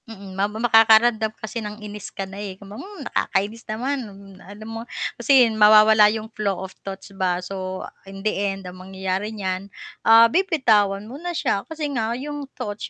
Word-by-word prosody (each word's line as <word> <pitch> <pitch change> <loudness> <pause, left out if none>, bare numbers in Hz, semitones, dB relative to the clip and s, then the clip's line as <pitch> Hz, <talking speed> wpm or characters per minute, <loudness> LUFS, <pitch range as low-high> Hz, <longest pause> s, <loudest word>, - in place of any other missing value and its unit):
Mm, 195 -3 -10
ma 195 +2 0
makakaramdam 225 0 +4
kasi 220 +2 -6
ng 210 0 -6
inis 210 -1 -8
ka 195 - -5
na, 195 +1 -9
eh, 195 -2 -6
kung 200 0 -12
ba - - -8
um, 405 +1 -10
nakakainis 210 +4 -1
naman, 260 +6 -2
mm, 195 -1 -14
alam 205 +2 -11
mo 225 0 -6 0.3
kasi 270 -3 +5
mawawala 215 0 +7
yung 215 0 -3
flow 200 -3 -1
of 190 - -11
thoughts 195 0 -9
ba. 185 -2 0
So 185 0 -5 0.2
in 195 +1 -10
the 215 - +2
end, 195 -1 -3
ang 180 0 -9
mangyayari 190 +2 -3
niyan, 195 -2 -4 0.3
ah, 225 +1 +7
bibitawan 230 - +2
mo 265 +7 -9
na 350 -1 -4
siya 230 -8 0
kasi 315 -1 -4
nga 230 -1 -1
yung 290 +1 -6
thoughts 205 0 -5
210 Hz, 185 wpm, -22 LUFS, 195-225 Hz, 0.3 s, mawawala